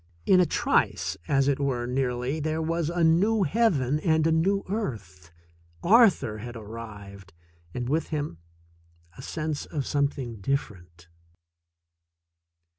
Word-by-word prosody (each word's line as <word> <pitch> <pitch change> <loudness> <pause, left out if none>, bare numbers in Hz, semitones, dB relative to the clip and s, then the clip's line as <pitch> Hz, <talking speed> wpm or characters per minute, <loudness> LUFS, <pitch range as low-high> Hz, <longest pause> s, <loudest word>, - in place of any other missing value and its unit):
In 185 - +5
a 180 - +4
trice, - - +1
as 135 -1 +2
it 140 -1 +1
were, 130 -4 -1
nearly, 125 +2 -1
there 155 +1 -2
was 165 0 -1
a 170 0 0
new 195 +7 +3
heaven 150 - +1
and 160 -1 +2
a 165 - +3
new 195 +5 +2
earth. 105 - -5 0.5
Arthur 190 - +4
had 120 +2 -8
arrived, 105 -4 -10 0.4
and 120 -1 -3
with 155 +5 0
him 145 - -4 0.8
a - - -10
sense 155 -2 -4
of 145 -5 -3
something 140 -5 -1
different. 90 -9 -4
140 Hz, 125 wpm, -26 LUFS, 115-165 Hz, 0.8 s, In